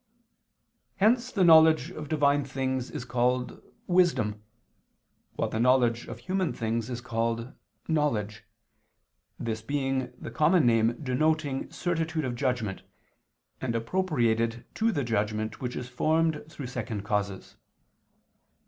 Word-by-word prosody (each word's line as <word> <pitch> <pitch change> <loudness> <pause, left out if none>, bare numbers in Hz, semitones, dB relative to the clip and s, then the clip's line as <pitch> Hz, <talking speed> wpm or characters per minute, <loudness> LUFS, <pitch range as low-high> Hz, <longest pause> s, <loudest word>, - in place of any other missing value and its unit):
Hence 235 +5 +2
the 195 - +2
knowledge 160 -2 +6
of 155 -5 -7
Divine 145 -2 +3
things 130 -1 -2
is 140 -6 -6
called 125 +1 0 0.2
"wisdom," 165 - +2 0.9
while - - -1
the 110 - -3
knowledge 120 -1 +3
of - - -7
human 185 -3 -1
things 115 0 -2
is 120 -1 -4
called 115 0 -2 0.3
"knowledge," 110 -10 0 0.9
this 110 -1 -3
being 135 0 -1
the - - -7
common 160 0 +3
name 115 0 +3
denoting 145 +1 0
certitude 160 -3 -2
of 125 - -2
judgment, 120 -6 -2 0.8
and 120 -3 -2
appropriated 115 -5 0
to 225 +1 +1
the 145 -9 -1
judgment 110 0 -2
which 125 -1 -3
is 125 - -5
formed 155 +5 +1
through 145 -3 -7
second 115 -4 -4
causes. 100 -2 -3
125 Hz, 120 wpm, -28 LUFS, 115-155 Hz, 0.9 s, knowledge